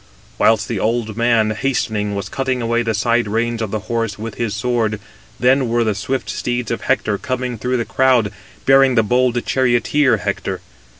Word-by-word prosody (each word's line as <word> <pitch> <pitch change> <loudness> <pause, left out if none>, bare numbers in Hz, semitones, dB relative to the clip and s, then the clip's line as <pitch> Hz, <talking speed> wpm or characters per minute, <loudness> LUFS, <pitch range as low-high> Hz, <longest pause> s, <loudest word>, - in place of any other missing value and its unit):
Whilst 110 -2 +3
the 115 -4 -2
old 110 0 -1
man 115 -2 +2
hastening, 110 -3 -1
was 100 -1 -4
cutting 130 +1 -2
away 115 0 0
the 115 -2 -1
side 120 +2 +1
reins 115 +2 -1
of 110 - -2
the 110 +1 -3
horse 115 -2 -2
with 110 0 -6
his 115 -2 -3
sword, 115 -2 -1 0.4
then 130 0 +3
were 120 0 +2
the 110 -2 +1
swift 125 +7 -3
steeds 120 -1 -3
of 115 - -2
Hector 110 -6 0
coming 130 -2 -3
through 125 +2 0
the 115 - -2
crowd, 125 -6 +2 0.3
bearing 135 -1 +5
the 115 - +4
bold 120 +2 +1
charioteer 130 +2 +2
Hector. - - -3
120 Hz, 180 wpm, -19 LUFS, 110-125 Hz, 0.4 s, bearing